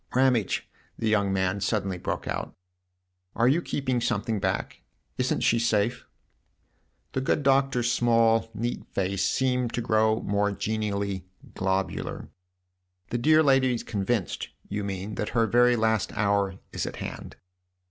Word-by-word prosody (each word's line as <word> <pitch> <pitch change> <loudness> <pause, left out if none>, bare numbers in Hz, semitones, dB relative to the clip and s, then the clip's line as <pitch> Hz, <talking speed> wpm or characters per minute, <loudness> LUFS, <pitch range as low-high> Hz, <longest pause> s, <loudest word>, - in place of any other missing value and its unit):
"Ramage," 125 -5 +2 0.3
the 115 - -2
young 100 -2 +2
man 95 +1 0
suddenly 95 -3 -1
broke - - -3
out, - - -4 0.4
" 90 0 -49
are 115 - +3
you 150 +7 +3
keeping 130 -6 -1
something 110 -2 -1
back? 95 -1 -2 0.4
Isn't - - +1
she 115 - +3
safe? 115 +1 0 0.5
" - - -44
The 130 - 0
good 145 +2 +1
Doctor's 135 -3 +3
small, 115 -1 +3
neat 120 +3 -3
face 95 0 0
seemed 125 +3 +1
to 120 - -1
grow 110 -1 +2
more 105 0 0
genially 100 -3 -2 0.3
globular. 95 0 -2 0.8
"The 120 - 0
dear 155 +5 +5
lady 135 -3 +4
is 115 - -5
convinced, 105 -1 -2 0.2
you 105 0 -3
mean, 100 +1 -4
that 105 - -2
her 115 - +5
very 120 +1 +4
last 110 -2 +1
hour 100 -2 +1 0.2
is - - -2
at - - -5
hand - - -7
110 Hz, 145 wpm, -27 LUFS, 100-120 Hz, 0.8 s, dear